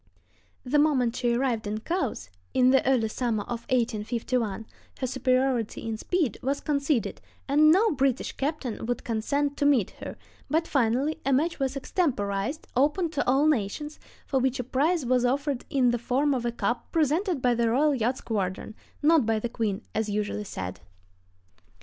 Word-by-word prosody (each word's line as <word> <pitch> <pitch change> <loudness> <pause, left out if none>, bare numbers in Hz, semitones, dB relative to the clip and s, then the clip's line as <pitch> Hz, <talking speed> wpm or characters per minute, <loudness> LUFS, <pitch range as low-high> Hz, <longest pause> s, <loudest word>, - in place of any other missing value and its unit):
The 285 +3 +2
moment 260 -6 +2
she 240 -2 +1
arrived 235 -4 0
in 215 +1 -3
Cowes, 270 - -3 0.2
in 255 0 +5
the 265 - +4
early 250 -4 +3
summer 220 -2 -1
of 235 -1 -6
1851, 230 -2 -1 0.3
her 260 - -2
superiority 255 -3 0
in 225 - -2
speed 300 - -1
was 275 +2 -1
conceded, 280 -4 -1 0.3
and 300 +2 +5
no 420 +6 +4
British 270 -3 0
captain 270 -6 -3
would 245 - -2
consent 280 +6 -1
to 290 - +1
meet 255 -10 +3
her; - - -7 0.3
but 320 +3 +1
finally 270 +4 +1
a 275 - 0
match 305 +6 +1
was 270 0 -1
extemporized, 255 - -1
open 300 +6 +2
to 290 -3 0
all 270 +3 +4
nations, 295 +2 -1 0.3
for 265 - 0
which 260 +1 0
a - - -1
prize 285 +5 +1
was 250 0 +2
offered 275 +1 0
in 260 -5 +3
the 240 - -1
form 270 +5 +1
of 240 -2 -1
a - - 0
cup 240 +1 -2
presented 330 +2 +1
by 250 -1 +2
the 235 -1 +1
Royal 290 +6 +3
Yacht 250 0 0
Squadron—not 220 - -1
by 225 -1 +2
the 230 +2 -3
Queen, 220 -2 -2
as 220 -1 -1
usually 210 0 -2
said. 95 - -6
255 Hz, 170 wpm, -27 LUFS, 230-290 Hz, 0.3 s, in